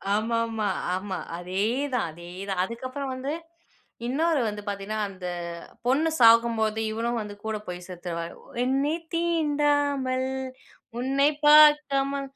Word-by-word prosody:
ஆமாமா, 225 -1 0 0.3
ஆமா. 190 -1 -4 0.2
அதேதான் 220 +7 -1
அதேதான். 180 +3 -4
அதுக்கப்புறம் 255 +4 -5
வந்து 265 +3 -3 0.8
இன்னொரு 310 +3 +1
வந்து 210 0 -4
பார்த்தீங்கன்னா 205 +2 -3
அந்த 185 -2 -7 0.6
பொண்ணு 295 +6 +3
சாகும்போது 230 -2 +5
இவனும் 230 +1 -1
வந்து 205 -1 -7
கூட 220 -1 -1
போய் 180 0 -5
செத்துருவாரு. 170 -1 -5 0.3
என்னை 275 +4 +1 0.2
தீண்டாமல் 290 -5 +1 0.7
உன்னை 275 +3 +3 0.2
பார்க்காம 295 -2 +6
235 Hz, 100 wpm, -26 LUFS, 205-280 Hz, 0.8 s, பார்க்காம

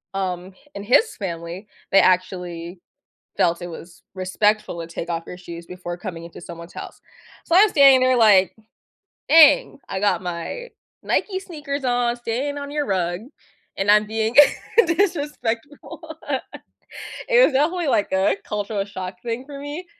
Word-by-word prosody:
um, 185 -1 -3 0.2
in 200 - -6
his 250 - +3
family, 175 +1 -6 0.2
they 195 - +6
actually 180 -1 -1 0.6
felt 170 0 +1
it 175 - -5
was 170 +1 -12
respectful 195 0 0
to 165 - -6
take 165 0 -7
off 165 -1 -3
your 180 - -9
shoes 170 -1 -10
before 180 -1 -7
coming 175 -3 -7
into 170 - -11
someone's 170 0 -10
house. - - -9 0.4
So 335 - -1
I 390 - +8
was 430 - +4
standing 275 -3 +7
there 255 - +3
like, 205 -5 +5 0.8
"Dang." 295 -2 +6
I 190 - -3
got 195 -3 +1
my 180 - -5 0.3
Nike 380 -3 -1
sneakers 295 -6 -6
on, 245 -1 +1
standing 250 +5 -3
on 285 0 -7
your 295 0 -1
rug, 175 -4 -1 0.6
and 195 +1 +2
I'm 210 0 +5
being 220 +2 -2 0.5
disrespectful. 295 - -2 1.3
It - - +6
was - - +3
definitely 320 +6 +1
like 210 - +1
a 190 +1 +2
cultural 205 -1 -3
shock 185 -2 -7
thing 235 +2 -4
for 285 -1 -9
me 295 +5 -7
210 Hz, 155 wpm, -22 LUFS, 180-280 Hz, 1.3 s, I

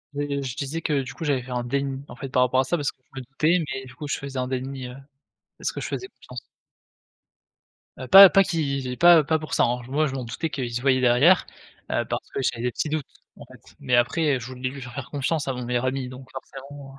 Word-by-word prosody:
Heu, 145 -1 -2
je 130 -1 -5
disais 150 +4 -4
que, 145 -3 0
du 125 - -8
coup, - - -8
j'avais 140 -5 0
fait 125 - -10
un 120 -1 -2
déni, 135 +2 -2
en - - -11
fait, 135 +1 -7
par 125 -1 +2
rapport 130 +1 +2
à - - 0
ça 175 +6 -1
parce 145 -1 -1
que - - -45 0.2
je - - -4
me - - -12
doutais 155 +7 +1
mais 130 0 -5
du 125 - -13
coup, 145 +2 -7
je - - -1
faisais 135 -1 -6
un 125 - -1
déni, 130 0 -4
heu, 125 - -9 0.6
parce - - -2
que - - -6
je - - -4
faisais 380 - -5
confiance. - - -11 1.6
Heu, - - -7
pas 195 0 +11
pas 195 - +5
qui 140 -7 -2
pas 175 -3 +7
pas 160 +2 +1
pour 155 - -7
ça, - - +3
hein, 120 +1 0
moi 150 +3 +1
je 135 - -5
m'en 130 -2 -4
doutais 140 +8 -4
qu'ils 125 -5 -4
se 120 - -2
voyaient 130 -1 +3
derrière, 130 +9 +5 0.5
heu, - - 0
parce - - -4
que - - -3
j'avais 120 -2 -1
des 125 - 0
petits 150 - -3
doutes, 155 -2 -2 0.3
en - - -11
fait, - - -18
mais 125 - +1
après, 135 +3 +2
je 120 - -8
voulais 130 0 -4
lui 140 0 -9
faire 120 -1 -9
faire 140 -2 -7
confiance 145 +1 -1
à 135 - 0
mon 125 -1 -5
meilleur 125 +1 -1
ami 130 0 -2
donc 130 0 -11
forcément. 135 +1 -10
135 Hz, 260 wpm, -24 LUFS, 125-145 Hz, 1.6 s, pas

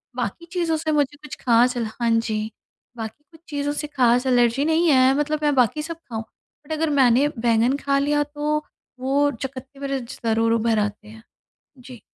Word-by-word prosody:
बाकी 245 +6 -4
चीज़ों 340 -3 0
से 310 0 -2
मुझे 290 -2 +1
कुछ 300 - -7
खास 245 +1 +4
एल 235 - -1
हाँ 235 - +1
जी, 220 -1 0 0.5
बाकी 225 +5 -7
कुछ 320 - -17
चीज़ों 290 0 -2
से 300 - -5
खास 250 -3 +2
एलर्जी 245 +2 +3
नहीं 320 +2 +2
है 260 -2 +5
मतलब 300 +1 0
मैं 295 - +3
बाकी 255 +4 +2
सब 330 +1 -6
खाऊँ। 225 -2 -4 0.4
बट 285 - -11
अगर 315 0 0
मैंने 270 -1 +4
बैंगन 235 +2 +2
खा 280 -1 0
लिया 295 +1 +2
तो 295 +1 -2 0.4
वो 280 +2 +2
चकत्ते 265 +1 -8
मेरे 275 -1 -2
ज 240 0 -9
ज़रूर 225 0 +2
उभर 230 -1 +2
आते 210 0 -3
हैं। 220 +1 -13 0.5
जी। 250 -2 -12
265 Hz, 190 wpm, -23 LUFS, 230-295 Hz, 0.5 s, है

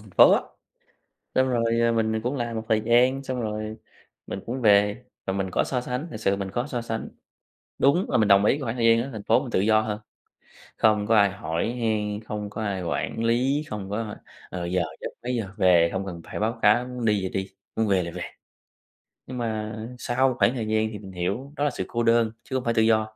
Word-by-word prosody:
thành 105 -1 -16
phố - - +7
á, - - +4 0.9
xong 130 0 +3
rồi, 115 -1 +1
ờ, 115 0 +3
mình, 110 -1 +1
ờ, 110 - 0
cũng 130 +4 -1
làm 120 -2 -3
một 110 - -2
thời 110 -1 +3
gian, 125 +4 +3
xong 130 -2 -3
rồi 110 -1 -4 0.5
mình - - -5
cũng 125 +3 -3
về 105 +2 +4 0.2
và 95 - 0
mình 95 -1 -2
có - - +1
so 125 -2 -1
sánh, 125 +6 -4
thực 110 - -6
sự 100 -2 +1
mình 95 -1 -4
có 120 +6 -2
so 125 -5 -3
sánh. 115 -1 -4 0.7
Đúng 170 +8 +3
là - - +2
mình 110 -1 +3
đồng 100 0 +6
ý 105 - +4
cái 145 - -5
khoảng 115 -2 -2
thời 115 -2 +2
gian 115 0 +5
ở 135 - -6
thành 110 -2 -6
phố - - +3
mình - - -6
tự - - +1
do 110 +1 +4
hơn, 105 -1 -3 0.8
không 105 -2 +3
có 115 - +4
ai 100 -2 +6
hỏi 95 +2 -2
han, 105 -2 -1
không 105 -2 -4
có 110 +1 -6
ai 100 -3 -2
quản 115 +6 -2
lý, 130 +6 +2
không 100 -2 -5
có, 105 - -2
ơ, 110 -2 -4 0.3
ờ, 90 -1 -4
giờ 90 0 +1 0.2
giấc, - - -3
mấy 125 0 -1
giờ 110 -5 -2
về, 90 -4 +5
không 95 +1 -2
cần 85 -3 -7
phải - - -6
báo 115 +2 -1
cáo, 105 +4 +4
muốn 125 -2 -5
đi 105 -2 +3
thì 95 - -2
đi, 95 0 -3 0.3
muốn 110 -1 +1
về 95 -3 +2
là 85 - -5
về. 90 +1 -5 1.0
Nhưng 125 -1 -6
mà 110 -2 -3 0.2
sau 130 +2 +1
khoảng 105 +4 +4
thời 115 -4 -3
gian 110 0 +1
thì 105 - -7
mình 95 -2 -10
hiểu 100 +11 -3
đó 145 - -1
là 145 - +3
sự 125 - -4
cô 120 0 -1
đơn, 115 -1 +3
chứ 130 - -6
hông 130 - -1
phải 115 - +2
tự 110 - +3
do. 110 -1 +2
110 Hz, 250 wpm, -25 LUFS, 100-120 Hz, 1.0 s, phố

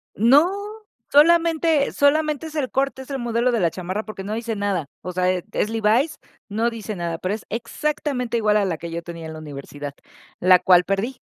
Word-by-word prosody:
No, 275 - +5 0.6
solamente 325 -1 +4
solamente 305 +1 +2
es 310 - -10
el 280 -4 -1
corte, 270 0 -1
es 265 - -12
el 275 - -2
modelo 240 +1 +1
de 235 - +1
la 170 -3 +2
chamarra 185 +3 -4
porque 215 -3 -8
no 210 +2 -4
dice 230 -1 -3
nada. 200 -6 -1 0.2
O 180 - -5
sea, 180 0 0
es 185 +3 -2
Levi's. 225 +8 +2 0.3
No 225 +3 +1
dice 220 -2 -6
nada, 170 -2 -3
pero 185 +4 -2
es 220 - -6
exactamente 250 0 -2
igual 210 -1 +3
a 205 - +2
la 175 -4 -2
que 170 +1 -7
yo 170 +1 -4
tenía 170 -1 -8
en 160 - -7
la 155 - -8
universidad, 145 -1 -8 0.4
la 185 0 +6
cual 180 -1 +5
perdí. 200 +7 -2
220 Hz, 200 wpm, -22 LUFS, 180-275 Hz, 0.6 s, la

